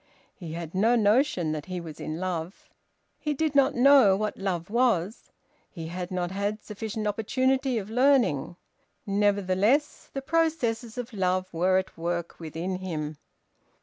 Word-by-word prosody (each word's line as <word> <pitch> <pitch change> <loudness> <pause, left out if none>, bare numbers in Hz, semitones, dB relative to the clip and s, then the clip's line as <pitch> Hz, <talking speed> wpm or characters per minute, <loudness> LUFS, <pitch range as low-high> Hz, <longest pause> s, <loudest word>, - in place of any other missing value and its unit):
He 165 -4 -8
had 165 -1 -6
no 220 +6 +3
notion 215 - +2
that 155 +1 -4
he 185 -1 -4
was 160 -3 -9
in 155 +2 -4
love. 180 -1 -4 0.5
He 300 -1 -2
did 310 +1 0
not 275 -1 +4
know 250 -6 +6
what 215 +1 -2
love 185 -2 -3
was; 225 -5 +1 0.4
he 165 -3 -7
had 180 +1 -5
not 180 -1 -2
had 205 +2 -2
sufficient 215 +1 -5
opportunity 255 +5 +1
of 210 0 -5
learning. 245 - +3 0.5
Nevertheless 205 +6 +1
the 275 - -5
processes 260 -8 0
of 245 0 -5
love 185 -2 0
were 185 +3 +3
at 190 -3 -3
work 170 0 -3
within 170 +3 -4
him. 155 -5 -4
200 Hz, 150 wpm, -27 LUFS, 175-245 Hz, 0.5 s, know